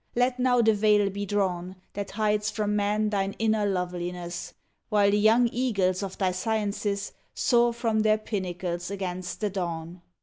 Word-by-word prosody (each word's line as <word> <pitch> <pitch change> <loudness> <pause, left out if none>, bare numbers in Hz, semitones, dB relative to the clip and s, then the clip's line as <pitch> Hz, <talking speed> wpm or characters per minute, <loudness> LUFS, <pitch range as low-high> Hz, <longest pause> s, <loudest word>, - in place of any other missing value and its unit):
Let 250 +1 +1
now 250 -1 +3
the 220 0 +5
veil 210 -1 +3
be 200 +1 -4
drawn 185 -3 -1 0.2
That 200 -1 -4
hides 210 0 0
from 210 -1 -1
man 210 +1 +1
thine 195 -1 0
inner 220 -2 +1
loveliness, 180 -2 -4 0.3
While 205 -1 +4
the 205 - +3
young 225 +3 +5
eagles 200 -7 0
of 195 -2 -5
thy 190 -2 +1
sciences 205 0 -2 0.2
Soar 240 -1 +3
from 230 -2 0
their 215 0 +4
pinnacles 180 -4 -4
against 185 -2 -4
the 210 -2 0
dawn 170 -2 -4
205 Hz, 160 wpm, -27 LUFS, 185-215 Hz, 0.3 s, the